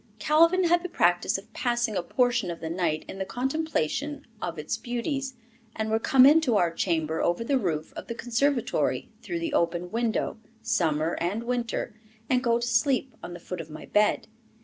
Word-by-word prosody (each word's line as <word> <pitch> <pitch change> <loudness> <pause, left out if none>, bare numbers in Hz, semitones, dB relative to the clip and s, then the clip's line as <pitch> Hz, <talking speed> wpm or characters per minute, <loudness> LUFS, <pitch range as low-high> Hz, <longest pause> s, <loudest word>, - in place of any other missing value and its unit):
Calvin 330 +9 +4
had 345 0 +3
the 360 - -5
practice - - +2
of - - -13
passing 240 -4 0
a 180 - +1
portion 245 0 +1
of 170 - -5
the 160 - -5
night 165 -3 -1
in 190 - -8
the - - 0
contemplation 285 - -2 0.2
of 170 -1 -4
its 150 0 -2
beauties, 265 +2 -3 0.4
and 220 0 -2
would 220 0 +1
come 260 +1 +6
into 290 -4 +5
our 175 -4 +2
chamber 160 -2 0
over 175 +6 +1
the 270 +3 +1
roof 160 -8 -2
of - - -8
the 235 - -4
conservatory 245 +2 0
through 345 - -4
the 335 -3 -3
open 175 -1 0
window, 230 -1 -1 0.2
summer 165 -7 +1
and 200 +7 -1
winter, 240 -2 -2 0.4
and 250 0 +3
go 235 -2 +3
to 235 - -2
sleep 255 +2 +1
on 175 - -7
the - - -9
foot 180 0 -6
of 160 - -11
my 155 - -9
bed. 210 0 +2
235 Hz, 190 wpm, -27 LUFS, 175-265 Hz, 0.4 s, come